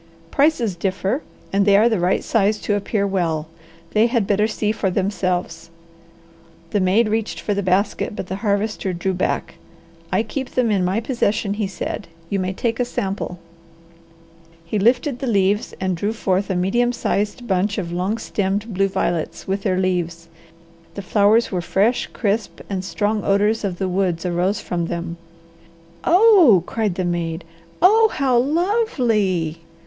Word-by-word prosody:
"Prices 275 Hz, -, +2 dB
differ, 195 Hz, -, -1 dB, 0.3 s
and 200 Hz, 0 st, +3 dB
they 200 Hz, 0 st, +5 dB
are 220 Hz, +3 st, +5 dB
the 220 Hz, -5 st, +1 dB
right 180 Hz, +2 st, +1 dB
size 215 Hz, -1 st, +2 dB
to 210 Hz, -, 0 dB
appear 205 Hz, 0 st, 0 dB
well. 165 Hz, -5 st, -1 dB, 0.4 s
They 220 Hz, +2 st, +4 dB
had 235 Hz, -4 st, +1 dB
better 210 Hz, +2 st, +2 dB
see 215 Hz, -1 st, -1 dB
for 205 Hz, -2 st, -1 dB
themselves." 180 Hz, -3 st, -2 dB, 1.0 s
The 205 Hz, -, +1 dB
maid 195 Hz, +5 st, +3 dB
reached 220 Hz, 0 st, -2 dB
for 205 Hz, -, -1 dB
the 200 Hz, -, -1 dB
basket, 195 Hz, +2 st, 0 dB
but -, -, -4 dB
the 190 Hz, +1 st, -4 dB
Harvester 205 Hz, -2 st, -1 dB
drew 190 Hz, +2 st, -1 dB
back. 180 Hz, -, -2 dB, 0.5 s
"I 220 Hz, -, +2 dB
keep 260 Hz, +4 st, -5 dB
them 245 Hz, -3 st, +2 dB
in 195 Hz, -3 st, +2 dB
my 190 Hz, +5 st, 0 dB
possession," 215 Hz, -4 st, 0 dB
he 205 Hz, -1 st, -2 dB
said. 190 Hz, -, -5 dB, 0.2 s
"You 200 Hz, -, +1 dB
may 185 Hz, 0 st, -1 dB
take 230 Hz, +4 st, -2 dB
a -, -, +3 dB
sample." 195 Hz, -6 st, -3 dB, 1.3 s
He 205 Hz, +5 st, -1 dB
lifted 245 Hz, +5 st, +2 dB
the 270 Hz, -, -3 dB
leaves 200 Hz, -1 st, +1 dB
and 185 Hz, -1 st, -1 dB
drew 205 Hz, +6 st, -2 dB
forth 195 Hz, -3 st, 0 dB
a 190 Hz, -, 0 dB
medium 240 Hz, +7 st, +1 dB
sized 210 Hz, +2 st, -2 dB
bunch 195 Hz, +1 st, 0 dB
of 175 Hz, -4 st, -3 dB
long 185 Hz, +5 st, -1 dB
stemmed 205 Hz, 0 st, -2 dB
blue 195 Hz, +1 st, +2 dB
violets 175 Hz, -4 st, -2 dB
with 195 Hz, +1 st, -1 dB
their 190 Hz, -2 st, 0 dB
leaves. 170 Hz, -3 st, -1 dB, 0.7 s
The 200 Hz, -, -5 dB
flowers 210 Hz, +4 st, +3 dB
were 180 Hz, -2 st, -1 dB
fresh, 205 Hz, +7 st, +1 dB
crisp, 210 Hz, 0 st, -2 dB
and 190 Hz, -1 st, -2 dB
strong 205 Hz, +2 st, -1 dB
odours 210 Hz, +3 st, +2 dB
of 190 Hz, -3 st, -2 dB
the 190 Hz, -, -1 dB
woods 185 Hz, -2 st, -1 dB
arose 180 Hz, +3 st, 0 dB
from 170 Hz, -2 st, -2 dB
them. 170 Hz, 0 st, -4 dB, 0.9 s
"Oh!" 355 Hz, -, +6 dB
cried 215 Hz, -4 st, -1 dB
the 185 Hz, 0 st, -1 dB
maid. 170 Hz, -1 st, -2 dB, 0.4 s
"Oh, 440 Hz, +4 st, +6 dB
how 265 Hz, -3 st, +1 dB
lovely!" 245 Hz, -, +1 dB
200 Hz, 165 wpm, -21 LUFS, 185-225 Hz, 1.3 s, Oh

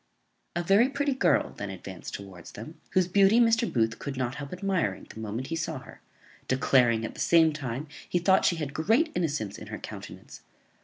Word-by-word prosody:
A 175 Hz, -, 0 dB
very 200 Hz, +8 st, +4 dB
pretty 280 Hz, 0 st, 0 dB
girl 260 Hz, -, +2 dB
then 105 Hz, -, -5 dB
advanced 95 Hz, -1 st, -7 dB
towards 95 Hz, -4 st, -10 dB
them, 115 Hz, +10 st, -10 dB
whose 185 Hz, -2 st, +3 dB
beauty 200 Hz, +4 st, +5 dB
Mr. 230 Hz, 0 st, +3 dB
Booth 115 Hz, -1 st, 0 dB
could 140 Hz, -2 st, -5 dB
not 125 Hz, -1 st, -1 dB
help 145 Hz, -1 st, -7 dB
admiring 180 Hz, -, -1 dB
the -, -, -11 dB
moment 110 Hz, +4 st, -4 dB
he 165 Hz, -, -2 dB
saw 160 Hz, -2 st, -3 dB
her; 130 Hz, -, -13 dB, 0.5 s
declaring, 125 Hz, -3 st, +3 dB
at -, -, -6 dB
the -, -, -12 dB
same 165 Hz, -2 st, +5 dB
time, 135 Hz, 0 st, -4 dB, 0.2 s
he -, -, +1 dB
thought 190 Hz, +2 st, +4 dB
she 175 Hz, -, +3 dB
had 150 Hz, -4 st, -4 dB
great 230 Hz, -, +2 dB
innocence 145 Hz, -, -2 dB
in -, -, -10 dB
her -, -, -6 dB
countenance. -, -, -10 dB
150 Hz, 195 wpm, -28 LUFS, 115-190 Hz, 0.5 s, beauty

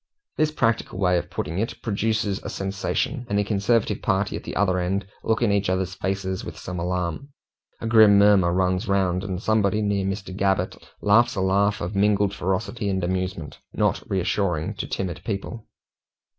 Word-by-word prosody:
This 155 Hz, 0 st, +2 dB
practical 115 Hz, -9 st, 0 dB
way 90 Hz, -2 st, +3 dB
of -, -, -8 dB
putting 80 Hz, +5 st, -3 dB
it 115 Hz, -, -3 dB
produces 105 Hz, -2 st, 0 dB
a -, -, -6 dB
sensation, 100 Hz, +7 st, -2 dB
and 100 Hz, -, +1 dB
the 105 Hz, -, +3 dB
conservative 105 Hz, +2 st, +1 dB
party 100 Hz, 0 st, 0 dB
at -, -, -6 dB
the -, -, -6 dB
other 95 Hz, -2 st, +2 dB
end 95 Hz, +3 st, -1 dB, 0.2 s
look 110 Hz, +1 st, +1 dB
in 110 Hz, -, +3 dB
each 100 Hz, -1 st, +1 dB
other's 95 Hz, -1 st, -1 dB
faces 95 Hz, 0 st, -3 dB
with -, -, -8 dB
some 90 Hz, -1 st, -6 dB
alarm. 90 Hz, -, -2 dB, 0.5 s
A -, -, -4 dB
grim 110 Hz, -3 st, +6 dB
murmur 100 Hz, -4 st, +5 dB
runs 90 Hz, +1 st, +1 dB
round, 95 Hz, -2 st, +1 dB
and 95 Hz, -2 st, -3 dB
somebody 105 Hz, -1 st, +1 dB
near 100 Hz, -1 st, 0 dB
Mr. 95 Hz, -1 st, -4 dB
Gabbett 95 Hz, -2 st, 0 dB, 0.3 s
laughs 115 Hz, +4 st, +4 dB
a 95 Hz, -, -1 dB
laugh 100 Hz, +2 st, +2 dB
of 90 Hz, +4 st, -4 dB
mingled 100 Hz, 0 st, +2 dB
ferocity 100 Hz, +4 st, -2 dB
and 95 Hz, -2 st, -1 dB
amusement, 90 Hz, -4 st, -3 dB
not -, -, +1 dB
reassuring 90 Hz, -3 st, 0 dB
to -, -, -4 dB
timid 95 Hz, -3 st, -3 dB
people. 110 Hz, +2 st, -5 dB
100 Hz, 175 wpm, -24 LUFS, 95-105 Hz, 0.5 s, grim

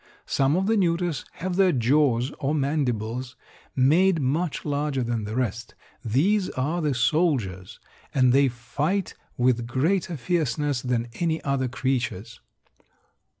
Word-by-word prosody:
Some 135 Hz, +2 st, +1 dB
of 190 Hz, +2 st, +1 dB
the 220 Hz, +2 st, +2 dB
neuters 170 Hz, -5 st, 0 dB
have 185 Hz, 0 st, -4 dB
their 190 Hz, -2 st, +5 dB
jaws, 130 Hz, -1 st, +2 dB
or 145 Hz, +1 st, 0 dB
mandibles, 125 Hz, -4 st, -1 dB, 0.4 s
made 165 Hz, +7 st, +4 dB
much 150 Hz, +4 st, -1 dB
larger 145 Hz, -2 st, -1 dB
than 115 Hz, -2 st, -2 dB
the 105 Hz, +2 st, -5 dB
rest. 115 Hz, -3 st, -3 dB, 0.3 s
These 180 Hz, -, +2 dB
are 155 Hz, +7 st, 0 dB
the 150 Hz, -4 st, 0 dB
soldiers, 120 Hz, -, 0 dB, 0.3 s
and 130 Hz, -2 st, +3 dB
they 140 Hz, +1 st, +5 dB
fight 145 Hz, +10 st, -2 dB, 0.2 s
with 120 Hz, -1 st, +1 dB
greater 165 Hz, +7 st, 0 dB
fierceness 145 Hz, -3 st, -1 dB
than 120 Hz, -2 st, -1 dB
any 165 Hz, -2 st, 0 dB
other 140 Hz, -2 st, 0 dB
creatures. 125 Hz, -4 st, -3 dB
135 Hz, 130 wpm, -25 LUFS, 120-165 Hz, 0.4 s, their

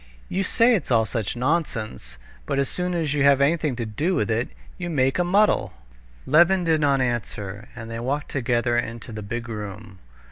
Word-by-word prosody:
"You 190 Hz, +2 st, 0 dB
say 230 Hz, +5 st, +4 dB
it's 205 Hz, -, -1 dB
all 115 Hz, -3 st, +4 dB
such 110 Hz, -2 st, -3 dB
nonsense, 125 Hz, -, -2 dB, 0.3 s
but -, -, -1 dB
as 140 Hz, -1 st, +2 dB
soon 180 Hz, 0 st, -2 dB
as 160 Hz, -4 st, 0 dB
you 145 Hz, -1 st, +1 dB
have 140 Hz, -1 st, +5 dB
anything 150 Hz, -1 st, +2 dB
to 120 Hz, -1 st, -3 dB
do 150 Hz, -, -1 dB
with 105 Hz, -6 st, 0 dB
it, 115 Hz, +3 st, 0 dB, 0.3 s
you 175 Hz, -1 st, -3 dB
make 135 Hz, -1 st, +1 dB
a -, -, +4 dB
muddle." 200 Hz, +4 st, +2 dB, 0.5 s
Levin 175 Hz, +5 st, +5 dB
did 160 Hz, -2 st, +2 dB
not 140 Hz, -2 st, +3 dB
answer, 110 Hz, -4 st, -3 dB
and 115 Hz, -1 st, -8 dB
they 115 Hz, -, -4 dB
walked 140 Hz, +5 st, -2 dB
together 120 Hz, -2 st, 0 dB
into 115 Hz, 0 st, -6 dB
the 110 Hz, -1 st, -6 dB
big 120 Hz, +4 st, -5 dB
room. 105 Hz, -2 st, -7 dB
130 Hz, 190 wpm, -24 LUFS, 115-160 Hz, 0.5 s, have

